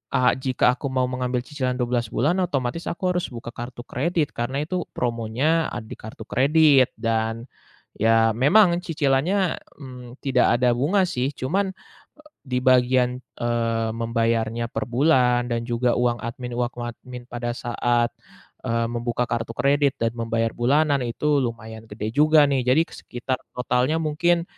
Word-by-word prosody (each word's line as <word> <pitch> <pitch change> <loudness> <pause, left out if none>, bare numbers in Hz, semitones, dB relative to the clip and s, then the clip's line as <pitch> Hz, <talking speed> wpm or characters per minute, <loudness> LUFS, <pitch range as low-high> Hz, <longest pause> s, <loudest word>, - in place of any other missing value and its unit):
a 125 - +4
jika 130 -1 +2
aku 140 - -5
mau 130 -1 +1
mengambil 125 0 -1
cicilan 130 -3 -3
12 120 -1 0
bulan, 155 +10 +1
otomatis 140 -1 -2
aku 180 +1 -1
harus 180 - -1
buka 120 0 -7
kartu 120 0 -8
kredit 165 +2 -1
karena 130 +5 -2
itu 180 +3 -2
promonya, 125 +7 0
ah, 120 - -5
di 110 - -9
kartu 110 0 -9
kredit. 140 -1 +4
Dan 115 0 -1 0.6
ya 115 +1 +4
memang 175 - +4
cicilannya, 165 +5 +1 0.2
mmm, 125 -2 -11
tidak 125 -3 +3
ada 125 -1 +3
bunga 175 +11 +2
sih. 130 -3 -1
Cuman, 190 +8 -1 0.7
di 125 -2 -1
bagian, 125 0 +3 0.2
eee, 115 -1 0
membayarnya 115 0 0
per 135 - -3
bulan 125 -2 +3
dan 115 0 -1
juga 120 0 +1
uang 120 -1 +1
admin 120 +1 -5
uang 120 0 -1
admin 120 +1 -8
pada 120 -1 -4
saat, 120 -1 0 0.6
eee, 115 0 +1
membuka 120 +1 -1
kartu 115 -1 -2
kredit 140 0 +2
dan 115 0 +1
membayar 115 -1 -1
bulanan 140 +4 +2
itu 145 +5 +1
lumayan 110 -1 -6
gede 105 +1 -5
juga 150 +1 +6
nih. 135 -2 +1
Jadi 140 +6 +5
ke - - -23
sekitar 125 +1 -4 0.2
totalnya 125 +4 +1
mungkin, 170 +2 +1
125 Hz, 150 wpm, -23 LUFS, 120-145 Hz, 0.7 s, juga